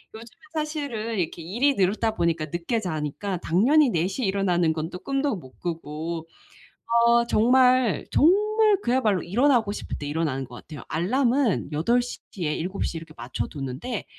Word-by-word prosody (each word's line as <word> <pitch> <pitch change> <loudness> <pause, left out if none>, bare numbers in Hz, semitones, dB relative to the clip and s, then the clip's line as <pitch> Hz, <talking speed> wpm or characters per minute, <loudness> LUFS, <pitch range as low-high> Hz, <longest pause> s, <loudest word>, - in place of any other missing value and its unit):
요즘에 225 +1 -12
사실은 285 -9 -3
이렇게 165 -1 -3
일이 245 - +1
늘다 215 +4 +1
보니까 165 -3 0
늦게 170 +8 -2
자니까 180 +1 -3
당연히 255 - +3
4 170 -5 +1
시에 220 +6 -3
일어나는 180 -4 +1
건 160 0 -4
또 180 - -7
꿈도 275 0 -1
못 130 -9 -13
꾸고 165 -1 -5 0.8
어 235 0 +5
정말, 250 0 +3
정말 425 +5 +4
그야말로 225 -7 +1
일어나고 235 +3 +2
싶을 205 - -5
때 145 - -6
일어나는 145 -3 -1
것 120 0 -11
같아요. 150 -1 -10
알람은 240 - +1
8 235 +12 +2
시 245 - -6
뒤에 160 -6 -2
7 185 +4 -3
시 - - -4
이렇게 160 -1 -9
맞춰두는데 135 - -5
195 Hz, 320 characters per minute, -25 LUFS, 165-250 Hz, 0.8 s, 어